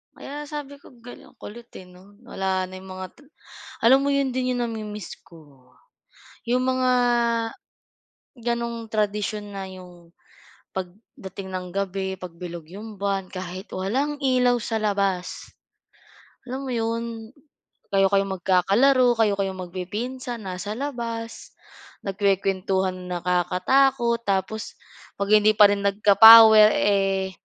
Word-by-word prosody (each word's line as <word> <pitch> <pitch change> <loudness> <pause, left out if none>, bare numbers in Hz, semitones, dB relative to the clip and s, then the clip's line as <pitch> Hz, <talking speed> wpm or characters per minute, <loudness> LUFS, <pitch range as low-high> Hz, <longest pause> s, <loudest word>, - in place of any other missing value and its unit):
Kaya 295 +2 -8
sabi 290 -1 -7
ko, 280 - -18
ga 245 +1 -11 0.2
kulit 235 +3 -11
eh 185 - -13
'no 190 +3 -19
wala 190 -3 -2
na 185 - -11
yung 190 0 -11
mga 185 - -8 0.7
alam 260 +4 +6
mo 280 - -1
yun 280 -2 +1
din 255 0 -1
yung 245 - -1
nami-miss 215 -3 -6
ko. 140 -6 -20 0.7
Yung 245 +2 +1
mga 255 0 +1 1.4
ganung 235 -1 -4
tradisyon 210 0 -2
na 195 - -5
yung 180 -2 -14 0.6
pagdating 190 0 -8
ng 180 -1 -4
gabi, 190 0 -3
'pag 180 -2 -9
bilog 170 -2 -8
yung 215 +1 -9
buwan 195 -1 -2
kahit 185 +1 -7
walang 265 +11 -2
ilaw 250 -3 +2
sa 225 -1 -3
labas, 195 -3 -2 0.9
alam 265 +2 -6
mo 260 - -4
yun, 230 0 -3 0.6
kayo 195 0 +4
kayo 195 0 +3
magkakalaro, 200 +8 +3
kayo 210 -3 +3
kayo 195 -1 -1
magpipinsan 215 +7 -6
nasa 195 +2 -5
labas. 235 -4 -6 0.5
Nagkukuwentuhan 190 -1 0
ng 180 - -10
nakakatakot, 235 +8 +1
tapos 200 +3 -2 0.4
'pag 200 0 -3
hindi 215 0 +5
pa 205 -1 +7
rin 200 0 -1
nagka-power, 215 +2 +8
eh, 195 -1 +1
205 Hz, 125 wpm, -24 LUFS, 190-235 Hz, 1.4 s, nagka-power